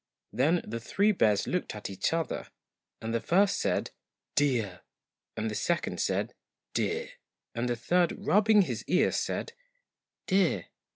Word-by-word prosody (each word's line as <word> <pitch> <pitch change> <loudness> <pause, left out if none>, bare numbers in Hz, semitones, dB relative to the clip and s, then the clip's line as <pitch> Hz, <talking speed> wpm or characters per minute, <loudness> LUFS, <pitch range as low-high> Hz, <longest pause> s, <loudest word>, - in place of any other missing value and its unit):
Then 155 +9 +2
the 115 +2 -4
three 200 - +2
bears 105 - +2
looked 180 -10 -2
at 105 - -5
each 95 -1 -1
other, 165 -1 -2 0.6
and 115 +1 -2
the 115 - +2
first 195 +3 +3
said - - 0 0.4
'DEAR!' 120 -11 +1 0.6
and 110 0 -1
the - - -4
second 170 +10 -1
said - - 0 0.2
' - - -59
DEAR! 465 +3 -1 0.2
' - - -61
and 120 +1 -1
the 120 - +1
third, 170 +9 +2
rubbing 210 +1 +4
his - - -4
ear, - - +3
said 465 - -2 0.7
'DEAR!' 190 -3 +1
160 Hz, 155 wpm, -29 LUFS, -, 0.7 s, rubbing